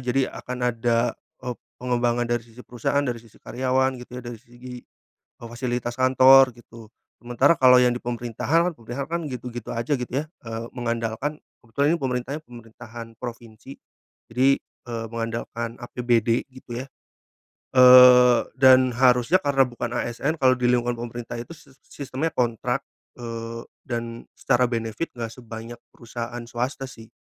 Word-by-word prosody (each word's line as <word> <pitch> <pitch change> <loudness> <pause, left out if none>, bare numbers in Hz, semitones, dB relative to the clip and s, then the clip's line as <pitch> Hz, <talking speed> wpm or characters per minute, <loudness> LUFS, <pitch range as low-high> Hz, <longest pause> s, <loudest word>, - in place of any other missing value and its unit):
jadi 125 +2 0
akan 125 0 -6
ada, 115 +1 +1 0.3
eee, 125 -1 -3 0.2
pengembangan 120 -1 0
dari 120 0 -1
sisi 120 +1 -15
perusahaan 125 +4 -1
dari 120 -3 -3
sisi 115 -2 -20
karyawan 130 +1 0
gitu 125 0 -10
ya - - -16
dari 120 -2 -7
segi, 125 0 -11 0.4
eee, 115 - -16
fasilitas 120 0 -3
kantor 130 0 +6
gitu. 115 -2 -15 0.3
Sementara 125 +6 +2
kalau 125 -1 +7
yang 125 -1 +3
di - - -6
pemerintahan, 120 +9 0
pemerintahan 120 +4 -6
kan 170 -1 -2
gitu-gitu 125 -4 -6
aja 120 +5 -1
gitu 125 -1 -6
ya, - - -8 0.2
eee, 115 0 -5
mengandalkan 120 +4 -3 0.2
kebetulan 140 +6 0
ini - - -18
pemerintahannya 130 +4 -3
pemerintahan 115 -1 -11
provinsi, 120 +1 -9 0.6
jadi, 125 +3 +2
eee, 115 -2 -8
mengandalkan 115 0 -4
APBD 120 -1 0
gitu 125 -2 -9
ya, - - -11 0.9
eee, 125 -1 +8 0.2
dan 130 -1 +6
harusnya 125 +6 +4
karena 140 -3 +3
bukan 120 -1 -5
ASN 135 +8 -2
kalau 130 -3 +4
di 125 - +1
lingkungan 120 -1 +1
pemerintah 120 0 -6
itu 145 +8 -9
sis 140 -2 -21
sistemnya 140 +3 -4
kontrak, 125 +2 -1 0.3
eee, 115 -1 -6 0.2
dan 115 -1 -5
secara 125 -1 +2
benefit 115 +6 -3
enggak 115 -2 -4
sebanyak 115 -1 -9 0.2
perusahaan 120 0 -6
swasta 125 +3 -4
sih. 115 -1 -14
120 Hz, 145 wpm, -24 LUFS, 115-130 Hz, 0.9 s, eee